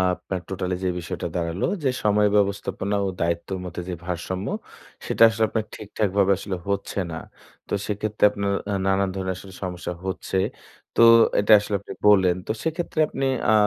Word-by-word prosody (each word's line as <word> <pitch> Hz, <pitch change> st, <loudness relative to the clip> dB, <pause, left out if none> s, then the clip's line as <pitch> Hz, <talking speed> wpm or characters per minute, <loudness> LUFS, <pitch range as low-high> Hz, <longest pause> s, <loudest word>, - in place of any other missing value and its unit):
আপনার 95 Hz, -2 st, -5 dB
টোটালি 90 Hz, -1 st, -2 dB
যে 95 Hz, -, +1 dB
বিষয়টা 85 Hz, 0 st, -4 dB
দাঁড়ালো 85 Hz, +1 st, -1 dB, 0.2 s
যে 135 Hz, -, +3 dB
সময় 105 Hz, 0 st, +4 dB
ব্যবস্থাপনা 100 Hz, 0 st, 0 dB
ও -, -, 0 dB
দায়িত্বের 85 Hz, +3 st, -1 dB
মধ্যে 90 Hz, 0 st, -5 dB
যে -, -, -2 dB
ভারসাম্য 90 Hz, +2 st, -3 dB, 0.6 s
সেটা -, -, +3 dB
আসলে 110 Hz, 0 st, -1 dB
আপনার 110 Hz, -2 st, -1 dB
ঠিকঠাকভাবে 100 Hz, -2 st, 0 dB
আসলে 100 Hz, -1 st, -4 dB
হচ্ছে 100 Hz, 0 st, -2 dB
না। 80 Hz, -, -4 dB, 0.5 s
তো -, -, -5 dB
সেক্ষেত্রে 105 Hz, 0 st, -3 dB
আপনার 100 Hz, -1 st, -2 dB, 0.2 s
আ -, -, 0 dB
নানান 95 Hz, 0 st, +2 dB
ধরনের 95 Hz, -1 st, -2 dB
আসলে 95 Hz, 0 st, -11 dB
সমস্যা 90 Hz, -1 st, -4 dB
হচ্ছে। 95 Hz, 0 st, -3 dB, 0.6 s
তো -, -, +4 dB, 0.4 s
এটা 105 Hz, -, +2 dB
আসলে 105 Hz, 0 st, -3 dB
আপনি 100 Hz, -, -9 dB
বললেন 95 Hz, -4 st, +5 dB
তো -, -, 0 dB
সেক্ষেত্রে 160 Hz, 0 st, -2 dB
আপনি 135 Hz, -2 st, -3 dB, 0.3 s
আ -, -, +5 dB
95 Hz, 165 wpm, -24 LUFS, 90-105 Hz, 0.6 s, বললেন